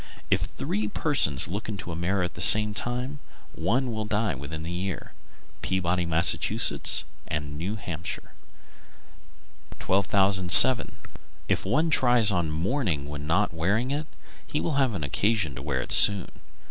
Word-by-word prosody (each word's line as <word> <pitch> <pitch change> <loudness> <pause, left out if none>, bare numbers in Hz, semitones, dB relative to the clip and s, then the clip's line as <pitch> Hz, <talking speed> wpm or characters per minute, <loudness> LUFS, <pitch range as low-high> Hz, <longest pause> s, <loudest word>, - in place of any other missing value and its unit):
If - - +1
three 105 +1 -4
persons 105 - +1
look 105 +6 -6
into 95 -4 -6
a - - -6
mirror 90 +3 -2
at 85 - -4
the 85 - -9
same 105 +2 +7
time, 125 +6 -3 0.3
one 120 +10 -1
will 110 -1 -4
die 105 -2 -1
within 70 +4 -8
the 85 - -6
year. 90 +1 -5 0.5
Peabody, 90 -1 -1
Mass., 85 +1 +2 0.9
and 75 -1 -5
New 90 +8 -4
Hampshire. 85 -5 -7 1.5
1207. 95 +3 +4 0.5
If - - -1
one 155 +10 0
try 125 -4 +3
on 85 -4 -1
mourning 80 - -2
when 75 0 -7
not 90 +3 0
wearing 100 +11 -1
it, 150 +2 -4 0.4
he 150 - -3
will 165 - -3
have 125 -5 0
occasion 90 +2 -1
to 65 - -9
wear 65 -3 -3
it - - -8
soon. 100 -4 +6
95 Hz, 145 wpm, -25 LUFS, 80-110 Hz, 1.5 s, same